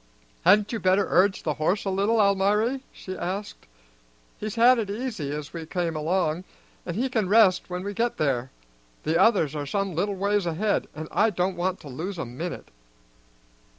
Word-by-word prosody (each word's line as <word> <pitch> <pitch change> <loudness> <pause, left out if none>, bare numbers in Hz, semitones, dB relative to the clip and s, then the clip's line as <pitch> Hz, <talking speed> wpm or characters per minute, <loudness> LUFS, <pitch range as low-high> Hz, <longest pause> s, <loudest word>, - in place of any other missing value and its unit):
"Hadn't 205 +4 +5
you 230 - -2
better 190 +1 +3
urge 190 +1 +2
the 155 - 0
horse 185 +7 +1
a 195 - 0
little, 205 +4 +1
Almiry?" 210 +6 +2
she 185 - -8
asked. 190 - -5 0.7
"He's 210 -1 -4
had 240 +2 +6
it 210 -3 -2
easy 215 - -4
as 150 0 -6
we 165 -1 -5
came 170 -2 -2
along, 165 +1 0 0.4
and 170 - -3
he 250 +6 0
can 220 -7 -1
rest 200 -4 +4
when 180 0 -4
we 205 +1 -4
get 235 +4 -1
there. 130 -4 0 0.5
The 160 +2 +2
others 165 -10 +3
are 145 -1 -4
some 195 +3 -1
little 195 +5 -1
ways 200 -1 0
ahead, 195 +6 0
and 155 +1 -6
I 220 - +3
don't 180 -1 -1
want 185 +2 -1
to - - -11
lose 170 +9 -5
a 165 - -3
minute." 145 +9 -6
190 Hz, 185 wpm, -25 LUFS, 165-210 Hz, 0.7 s, had